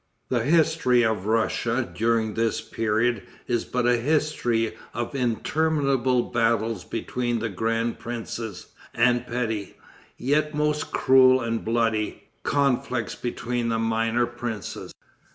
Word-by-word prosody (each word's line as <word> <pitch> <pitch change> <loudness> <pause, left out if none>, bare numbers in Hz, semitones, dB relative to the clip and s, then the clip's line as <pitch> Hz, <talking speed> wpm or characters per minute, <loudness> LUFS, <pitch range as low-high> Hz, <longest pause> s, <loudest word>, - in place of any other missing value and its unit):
The 120 -2 +1
history 155 -5 +3
of 110 -3 -1
Russia 115 +2 +1
during 115 -1 +1
this 115 0 0
period 115 +1 0 0.2
is 120 -2 -1
but 125 -1 -1
a 120 0 +4
history 120 -4 0 0.2
of 120 +4 -3
interminable 135 0 +1
battles 115 -3 +1
between 120 +2 -2
the 115 0 -2
grand 115 +4 -1
princes, 115 -4 -6 0.2
and 120 +1 +2
petty, 115 -4 -3 0.4
yet 150 +3 0
most 150 0 0
cruel 130 0 +5
and 115 -1 -2
bloody, 115 -2 0 0.2
conflicts 130 -5 0
between 120 -1 -3
the 115 - +1
minor 115 +1 +1
princes. 120 -3 -6
120 Hz, 115 wpm, -25 LUFS, 115-125 Hz, 0.4 s, cruel